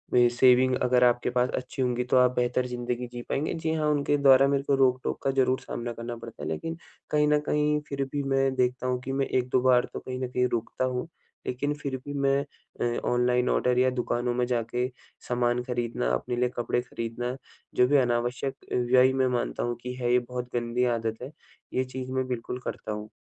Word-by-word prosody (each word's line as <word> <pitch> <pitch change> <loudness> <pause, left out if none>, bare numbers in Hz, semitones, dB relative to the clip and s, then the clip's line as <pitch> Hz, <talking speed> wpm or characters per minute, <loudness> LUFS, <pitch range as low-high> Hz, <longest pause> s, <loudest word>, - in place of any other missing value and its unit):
Saving 125 +1 +5
अगर 125 0 +4
आपके 120 0 +3
पास 125 0 +1
अच्छी 130 +1 -4
होंगी 125 -1 +1
तो 125 +1 +2
आप 125 0 +5
बेहतर 125 +1 +1
ज़िंदगी 125 0 -3
जी 120 0 -7
पाएँगे। 145 +3 -1
जी 160 -1 -2
हाँ, 155 -1 +1
उनके 145 0 +1
द्वारा 135 -1 +6
मेरे 140 0 +1
को 140 0 +2
रोक-टोक 130 -1 +1
का 135 - +2
ज़रूर 130 -1 +2
सामना 120 0 -5
करना 115 +1 -6
पड़ता 115 -9 -10
है। - - -3
लेकिन 165 - -4 0.3
कहीं 150 0 +3
न 150 0 +4
कहीं 150 0 +2
फिर 140 -1 -1
भी 145 -1 -1
मैं 135 -1 +1
देखता 125 0 0
हूँ 125 0 0
कि 130 - -5
मैं 135 0 +1
1-2 125 0 +1
बार 125 -1 +4
तो - - -4
कहीं 130 0 -6
न 130 - -2
कहीं 125 0 +2
रुकता 115 +2 -1
हूँ। 125 +3 -2 0.4
लेकिन 145 +4 -1
फिर 140 -2 -3
भी 145 - -5
मैं 140 -1 +2 0.6
अ, - - 0
ऑनलाइन 125 0 +2
ऑर्डर 125 0 +2
या 130 0 +4
दुकानों 120 -1 -1
में 125 0 +1
जाके 125 +1 -1 0.4
सामान 120 0 +1
खरीदना, 120 - -2
अपने 60 - -1
लिए 125 +1 +1
कपड़े 120 0 0
खरीदना 120 0 -4 0.4
जो 125 - +5
भी 145 - +4
अनावश्यक 125 +1 0 0.2
व्यय 125 +1 +4
मैं 130 -1 +2
मानता - - -2
हूँ 120 0 -1
कि 125 0 -4
है, 120 -1 -1
ये 125 - +5
बहुत 125 0 -6
गंदी 120 +1 0
आदत 110 0 -4
है। 130 +3 -7 0.4
ये 130 - +1
चीज 130 0 -6
मैं 130 0 -1
बिल्कुल 125 0 -4
करता - - -4
हूँ। 105 0 -5
125 Hz, 210 wpm, -27 LUFS, 120-130 Hz, 0.6 s, द्वारा